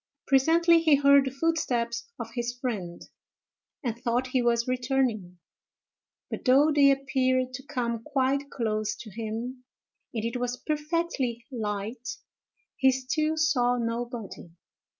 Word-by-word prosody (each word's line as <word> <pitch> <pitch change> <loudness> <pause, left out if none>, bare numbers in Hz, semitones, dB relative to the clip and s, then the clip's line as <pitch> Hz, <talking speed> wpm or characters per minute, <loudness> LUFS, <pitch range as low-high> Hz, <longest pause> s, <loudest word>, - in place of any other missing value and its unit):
Presently 330 +5 +4
he 315 -3 +5
heard 280 0 +5
the - - -1
footsteps 270 - -1
of - - -6
his 240 0 -3
friend, 200 -10 -4 0.8
and 235 -4 -1
thought 240 +2 0
he 255 0 0
was 235 0 +1
returning; 245 -7 -1 0.9
but - - -5
though 280 +4 +5
they 285 -2 +6
appeared 260 -2 +1
to 260 - -6
come 235 -6 -2
quite 275 +1 0
close 215 -4 -1
to 215 - -10
him, 230 +4 -5 0.5
and 225 -2 -3
it 230 +2 -2
was 245 0 -2
perfectly 300 -6 -2
light, 220 +1 -4 0.6
he 265 - +5
still 305 +5 -1
saw 250 -6 +2
nobody. 230 -5 -4
255 Hz, 130 wpm, -27 LUFS, 235-280 Hz, 0.9 s, they